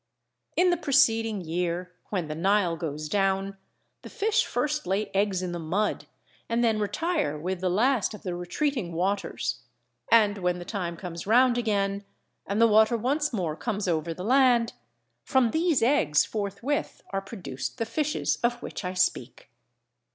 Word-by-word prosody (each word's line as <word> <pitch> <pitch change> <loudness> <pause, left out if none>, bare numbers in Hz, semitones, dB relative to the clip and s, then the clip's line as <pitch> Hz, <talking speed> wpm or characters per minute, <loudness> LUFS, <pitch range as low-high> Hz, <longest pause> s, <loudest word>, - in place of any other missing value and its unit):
In 360 0 +4
the 350 - +1
preceding 225 - +2
year, 175 +2 -3 0.2
when 180 -6 -2
the 155 - -4
Nile 180 +1 +2
goes 155 -2 -4
down, 195 +2 0 0.5
the - - -10
fish 445 +2 +1
first 300 +4 -1
lay 195 +3 -1
eggs 195 -2 +1
in 180 - -3
the 175 - -4
mud 185 +7 -1 0.4
and 230 +1 +1
then 225 -2 +2
retire 210 - -1
with 180 +4 -3
the 185 - +1
last 225 +3 +2
of - - -13
the 180 - -3
retreating 180 - -2
waters; 185 +1 -2 0.5
and 210 -3 +5
when 180 -1 0
the 175 - -8
time 175 -5 -4
comes 170 0 -7
round 245 +2 +5
again, 200 -4 0 0.4
and 200 +2 -1
the 230 - +7
water 220 +2 +4
once 280 +7 0
more 175 -9 -2
comes 205 +3 -3
over 165 -1 0
the 180 +3 -6
land, 245 -1 +4 0.5
from 255 -4 +2
these 320 -5 +2
eggs 175 - +3
forthwith 210 +7 -3
are 195 0 -1
produced 190 - -6
the 230 - -1
fishes 300 +6 -1
of 240 0 +1
which - - -6
I 180 0 -4
speak. 180 - -1
205 Hz, 165 wpm, -27 LUFS, 180-240 Hz, 0.5 s, the